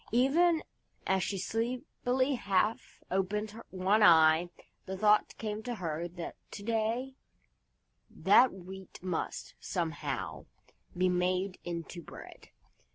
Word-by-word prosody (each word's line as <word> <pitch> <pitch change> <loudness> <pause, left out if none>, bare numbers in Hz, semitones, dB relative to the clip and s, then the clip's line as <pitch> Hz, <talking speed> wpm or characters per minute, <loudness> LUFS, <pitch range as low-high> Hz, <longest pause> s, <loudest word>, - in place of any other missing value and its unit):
Even 310 +8 +3 0.4
as 190 0 +2
she 195 +2 -2
sleepily 250 +5 -1
half 210 -2 0
opened 210 +4 -1
one 190 +3 +2
eye, 160 -2 +6 0.4
the 190 0 -4
thought 210 +1 +3
came 215 -1 -4
to 240 +1 -4
her 170 -3 -3
that 175 0 -7
to 200 - -8
day 230 +4 -1 0.9
that 255 - +5
Wheat 190 0 -10
must, 180 -3 -3
somehow, 165 -5 -3 0.5
be 185 +1 +3
made 185 +1 0
into 170 0 -5
bread. - - -12
195 Hz, 110 wpm, -31 LUFS, 180-230 Hz, 0.9 s, eye